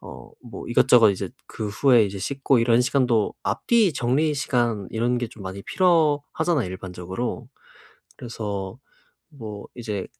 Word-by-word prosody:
어 -, -, -12 dB
뭐 -, -, -9 dB
이것저것 115 Hz, -4 st, +5 dB
이제 95 Hz, -, -5 dB, 0.2 s
그 110 Hz, -, -5 dB
후에 120 Hz, +2 st, +4 dB
이제 100 Hz, -1 st, -5 dB
씻고 135 Hz, +5 st, +1 dB
이런 115 Hz, 0 st, +3 dB
시간도 125 Hz, -4 st, +1 dB
앞뒤 225 Hz, -8 st, +2 dB
정리 140 Hz, +5 st, +1 dB
시간 120 Hz, -8 st, -1 dB
이런 120 Hz, +2 st, 0 dB
게 120 Hz, -2 st, -3 dB
좀 110 Hz, -, -13 dB
많이 95 Hz, +1 st, -6 dB
필요하잖아요. 160 Hz, -, +1 dB
일반적으로. 95 Hz, +6 st, -5 dB, 0.7 s
그래서 105 Hz, -3 st, -5 dB, 0.5 s
뭐 110 Hz, -8 st, -9 dB
이제 105 Hz, -5 st, -4 dB
120 Hz, 290 characters per minute, -23 LUFS, 100-140 Hz, 0.7 s, 이것저것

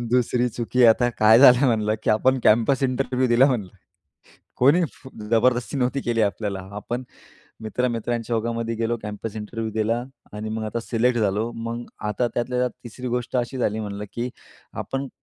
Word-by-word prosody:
2री 125 Hz, 0 st, +1 dB
चुकी 120 Hz, +2 st, +2 dB
आता 120 Hz, +2 st, +5 dB
काय 110 Hz, +2 st, +7 dB
झालं 130 Hz, 0 st, +7 dB
म्हणलं? 110 Hz, -3 st, +1 dB
की -, -, 0 dB
आपण 130 Hz, +5 st, +3 dB
कॅम्पस 120 Hz, +5 st, +3 dB
इंटरव्ह्यू 130 Hz, 0 st, 0 dB
दिला 120 Hz, +2 st, +5 dB
म्हणलं. 120 Hz, -9 st, -1 dB, 0.9 s
कोणी 150 Hz, +8 st, +4 dB
फ -, -, -14 dB, 0.2 s
जबरदस्ती 120 Hz, +3 st, +2 dB
नव्हती 130 Hz, +2 st, 0 dB
केली 115 Hz, -1 st, 0 dB
आपल्याला. 100 Hz, -1 st, -1 dB, 0.2 s
आपण 120 Hz, +4 st, -4 dB, 0.6 s
मित्र-मित्रांच्या 120 Hz, 0 st, -2 dB
ओघामध्ये 115 Hz, 0 st, -2 dB
गेलो 115 Hz, +1 st, -1 dB
कॅम्पस 105 Hz, +1 st, -6 dB
इंटरव्ह्यू 110 Hz, +1 st, -5 dB
दिला 110 Hz, +2 st, 0 dB, 0.3 s
आणि 105 Hz, +1 st, -5 dB
मग 110 Hz, 0 st, -3 dB
आता 110 Hz, +2 st, -3 dB
सिलेक्ट 120 Hz, +1 st, +1 dB
झालो. 105 Hz, +2 st, 0 dB
मग 115 Hz, +1 st, -5 dB, 0.2 s
आता 120 Hz, +3 st, 0 dB
त्यातल्या 125 Hz, +1 st, -1 dB
त्यात 125 Hz, 0 st, +1 dB
3री 125 Hz, +2 st, -6 dB
गोष्ट 125 Hz, +1 st, -2 dB
अशी 125 Hz, +1 st, -2 dB
झाली 110 Hz, -3 st, 0 dB
म्हणलं 105 Hz, -1 st, -5 dB
की 120 Hz, +1 st, -3 dB, 0.5 s
आपण 135 Hz, 0 st, -4 dB
120 Hz, 160 wpm, -23 LUFS, 110-125 Hz, 0.9 s, काय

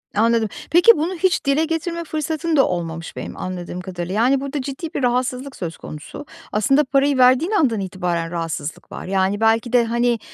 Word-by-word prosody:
Anladım. 225 Hz, 0 st, +2 dB, 0.2 s
Peki, 350 Hz, +7 st, +8 dB
bunu 325 Hz, +5 st, -1 dB
hiç 370 Hz, 0 st, +1 dB
dile 280 Hz, +3 st, +2 dB
getirme 335 Hz, +1 st, -3 dB
fırsatın 315 Hz, +1 st, -2 dB
da 270 Hz, -, +5 dB
olmamış 165 Hz, -2 st, -4 dB
benim -, -, -7 dB
anladığım 180 Hz, -1 st, -5 dB
kadarıyla. 180 Hz, -1 st, -5 dB
Yani, 250 Hz, +5 st, +3 dB
burada 280 Hz, 0 st, -3 dB
ciddi 280 Hz, +4 st, -6 dB
bir -, -, -2 dB
rahatsızlık 250 Hz, +2 st, -1 dB
söz 165 Hz, -3 st, -5 dB
konusu. 155 Hz, -, -9 dB, 0.3 s
Aslında 270 Hz, +8 st, +3 dB
parayı 275 Hz, 0 st, +2 dB
verdiğin 255 Hz, +8 st, +4 dB
andan 270 Hz, -, +2 dB
itibaren 175 Hz, -3 st, -2 dB
rahatsızlık 165 Hz, -3 st, -5 dB
var, -, -, -7 dB
yani, 195 Hz, +1 st, 0 dB
belki 225 Hz, +2 st, +2 dB
de, 240 Hz, -1 st, +5 dB
hani, 235 Hz, 0 st, +1 dB
245 Hz, 175 wpm, -21 LUFS, 185-290 Hz, 0.3 s, Peki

